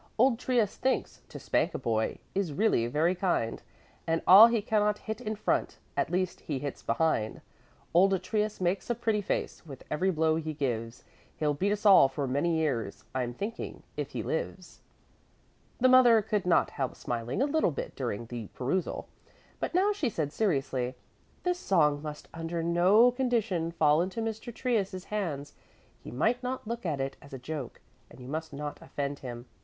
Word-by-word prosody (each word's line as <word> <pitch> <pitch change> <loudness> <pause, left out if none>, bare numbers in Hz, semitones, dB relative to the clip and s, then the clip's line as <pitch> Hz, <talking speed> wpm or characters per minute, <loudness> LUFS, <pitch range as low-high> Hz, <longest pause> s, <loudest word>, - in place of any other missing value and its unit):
Old 240 0 +4
Trius 240 -6 +1
thinks: 260 0 -1
To - - -8
spank - - 0
a - - 0
boy 110 -3 -1 0.2
Is 190 -6 -1
really 145 - +2
very 155 +8 +2
kind, 175 -11 -1 0.5
And 165 0 0
all 200 +5 +10
he 235 -1 +1
cannot 210 0 +1
hit 220 +2 -6
in 215 -2 -3
front 210 - -1 0.2
At - - 0
least 185 0 -1
he 145 - -4
hits 140 0 -5
behind. 115 -4 0 0.5
Old 190 +2 +5
Trius 210 +2 -1
makes 185 +4 -1
a 240 - +1
pretty 225 -2 0
face 190 - -3
With 140 -6 -11
every 170 +6 +1
blow 160 -2 +2
he 155 -1 -4
gives. 120 -4 -3 0.3
He'll 150 -1 +1
beat 195 +8 0
us 210 +1 -2
all 195 -9 +8
for 135 +1 -3
many 145 +6 +1
years, 125 -10 -2
I'm 125 -2 -2
thinking, 215 - -5
if - - -4
he - - -3
lives. - - -4 1.0
The 255 - +5
mother 245 -4 +7
could 205 -3 -1
not 175 - +3
help 135 -3 -3
smiling 120 +1 -3
a 270 - +3
little 305 - +2
bit 150 - -5
during 120 -4 -3
the 115 -2 -6
perusal, 160 +8 -2 0.5
but - - -3
now 400 +3 +3
she 315 -11 -1
said 155 -7 -3
seriously: 135 - 0 0.5
"This 360 0 0
song 150 - +2
must 150 -1 -7
under 165 0 -3
no 185 +8 +5
condition 230 -10 0
fall 155 -1 +3
into 185 +5 -3
Mr. 225 +1 -4
Trius' 205 -7 -1
hands. 150 -9 -3 0.5
He - - -8
might 230 - +1
not 250 -3 -4
look 235 -4 -3
at 150 -4 -1
it 135 0 -3
as 140 - -14
a - - -4
joke, 135 0 -6 0.3
and - - -15
you 125 - -10
must 160 +3 -4
not 145 +1 -6
offend 140 0 -4
him. 120 -2 -7
170 Hz, 180 wpm, -29 LUFS, 140-215 Hz, 1.0 s, all